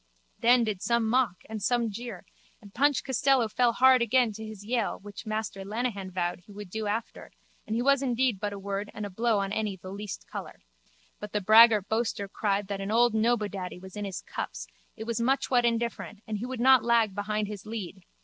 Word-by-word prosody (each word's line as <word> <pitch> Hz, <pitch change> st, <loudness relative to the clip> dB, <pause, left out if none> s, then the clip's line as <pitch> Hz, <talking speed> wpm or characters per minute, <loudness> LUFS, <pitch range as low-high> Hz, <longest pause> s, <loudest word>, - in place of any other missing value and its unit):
Then 240 Hz, +1 st, +5 dB
did 210 Hz, -4 st, -2 dB
some 235 Hz, -2 st, +1 dB
mock 230 Hz, -5 st, +1 dB
and 220 Hz, -1 st, -6 dB
some 235 Hz, +1 st, +1 dB
jeer 230 Hz, -3 st, -7 dB, 0.3 s
and 200 Hz, -2 st, -15 dB
Punch 285 Hz, +2 st, +2 dB
Costello 265 Hz, -2 st, +2 dB
fell 235 Hz, +2 st, +2 dB
hard 260 Hz, +1 st, +5 dB
again 235 Hz, 0 st, +3 dB
to 220 Hz, +1 st, -8 dB
his 215 Hz, -2 st, -9 dB
yale 230 Hz, -1 st, -1 dB
which 205 Hz, +1 st, -10 dB
Master 215 Hz, -2 st, -3 dB
Lenehan 205 Hz, -2 st, -3 dB
vowed 175 Hz, -1 st, -2 dB
he 180 Hz, +4 st, -18 dB
would 205 Hz, -2 st, -9 dB
do 220 Hz, 0 st, -3 dB
after 220 Hz, +3 st, -4 dB, 0.4 s
and 215 Hz, -, -2 dB
he 240 Hz, -, 0 dB
was 275 Hz, 0 st, +4 dB
indeed 250 Hz, -4 st, +1 dB
but 205 Hz, 0 st, -2 dB
a 200 Hz, -, -6 dB
word 200 Hz, +1 st, -4 dB
and 210 Hz, -, -4 dB
a 200 Hz, -, -7 dB
blow 225 Hz, +3 st, +1 dB
on 195 Hz, 0 st, -1 dB
any 210 Hz, -3 st, -2 dB
the 185 Hz, +1 st, -9 dB
least 200 Hz, 0 st, -6 dB
colour. -, -, -8 dB, 0.6 s
But 210 Hz, 0 st, -8 dB
the 210 Hz, -, +1 dB
braggart 215 Hz, 0 st, +7 dB
boaster 220 Hz, -3 st, -1 dB
cried 200 Hz, 0 st, -1 dB
that 200 Hz, -1 st, -4 dB
an 195 Hz, -, -4 dB
old 235 Hz, +1 st, +4 dB
Nobodaddy 210 Hz, -5 st, 0 dB
was 190 Hz, 0 st, -12 dB
in 205 Hz, -1 st, -4 dB
his 190 Hz, -3 st, -5 dB
cups -, -, -5 dB, 0.3 s
it -, -, -5 dB
was 235 Hz, +1 st, -2 dB
muchwhat 250 Hz, -1 st, +2 dB
indifferent 230 Hz, -2 st, -2 dB
and 215 Hz, -2 st, -4 dB
he 240 Hz, -, -4 dB
would 255 Hz, -2 st, -5 dB
not 260 Hz, 0 st, +6 dB
lag 230 Hz, -3 st, +3 dB
behind 210 Hz, +1 st, -2 dB
his 210 Hz, 0 st, -8 dB
lead. 200 Hz, -4 st, -6 dB
215 Hz, 210 wpm, -28 LUFS, 200-235 Hz, 0.6 s, braggart